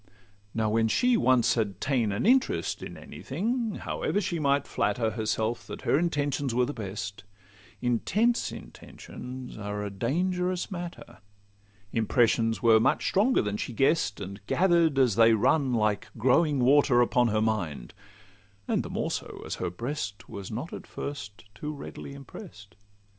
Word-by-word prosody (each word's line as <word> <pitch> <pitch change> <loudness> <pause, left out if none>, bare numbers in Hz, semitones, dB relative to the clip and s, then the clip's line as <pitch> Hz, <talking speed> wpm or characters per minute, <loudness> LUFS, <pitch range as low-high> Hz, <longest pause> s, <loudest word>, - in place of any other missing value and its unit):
Now 110 -1 +1
when 115 +1 +3
she 245 - +3
once 130 - +4
had 105 -4 -1
ta'en 125 -6 +1
an 100 - -1
interest 260 +3 +2
In - - -7
any - - -11
thing, 230 +1 -2
however 205 - -2
she 180 -4 -2
might 140 -1 +2
flatter 110 +2 0
Herself 110 +1 -2
that - - -8
her 140 - +3
intentions 145 -6 -1
were 125 0 +3
the 145 - -4
best, 100 -3 -6 0.6
Intense 210 - +1
intentions 125 -1 -9
are 105 0 -4
a 100 - -4
dangerous 180 - -1
matter: 175 -2 -7 0.7
Impressions 115 -1 +2
were 115 -1 +6
much - - +2
stronger 220 +7 +3
than 105 0 -2
she 120 - -4
guess'd, 135 -4 +2
And 100 +1 -7
gather'd 170 -5 +3
as 125 -7 +3
they 115 0 +7
run 135 +5 +2
like 105 -2 0
growing 140 +6 +3
water 135 -1 +5
Upon 120 0 +3
her 110 -1 +1
mind; 85 - -2 0.7
the - - -1
more - - -2
so, - - -5
as - - -4
her - - 0
breast 105 - -5
Was 100 -2 -7
not 125 +9 -5
at - - -8
first 105 -8 -7
too 150 +9 -5
readily 140 -1 -8
impress'd. 135 - -12
125 Hz, 155 wpm, -28 LUFS, 110-155 Hz, 0.7 s, they